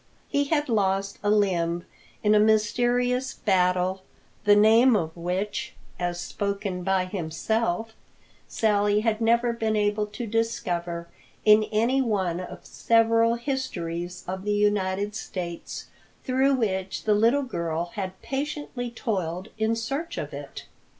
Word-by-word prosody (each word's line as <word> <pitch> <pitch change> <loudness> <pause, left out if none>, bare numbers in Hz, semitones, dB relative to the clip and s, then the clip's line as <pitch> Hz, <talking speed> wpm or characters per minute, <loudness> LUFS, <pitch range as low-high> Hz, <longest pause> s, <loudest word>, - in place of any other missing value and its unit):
He 285 0 +1
had 295 0 0
lost 200 -3 0
a 205 - 0
limb 175 -5 +1 0.4
in 210 0 +4
a 210 - +6
mysterious 240 +4 +2
battle, 185 -1 +1 0.4
the 205 0 +7
name 225 +4 +6
of 160 -5 -1
which, 190 +9 -3 0.2
as 175 0 -2
spoken 200 -1 -3
by 190 0 +1
himself, 200 +4 -2 0.5
Sally 210 -1 +2
had 225 0 0
never 235 +1 +3
been 220 -2 -1
able 210 0 +1
to 215 +4 -6
discover 175 -7 -2 0.4
in 215 0 +7
any 230 +5 +1
one 190 -8 0
of 180 - -8
several 230 0 +3
histories 180 - -4
of 190 +1 -4
the 210 0 0
United 205 -1 +1
States 175 -4 -6 0.4
through 265 +1 +2
which 190 -5 -2
the 215 - +3
little 230 +7 +3
girl 170 -7 -3
had 190 -2 -5
patiently 275 -3 -3
toiled 190 -5 -3
in 220 +1 +2
search 275 +9 -3
of - - -4
it. - - -8
210 Hz, 130 wpm, -26 LUFS, 185-230 Hz, 0.5 s, the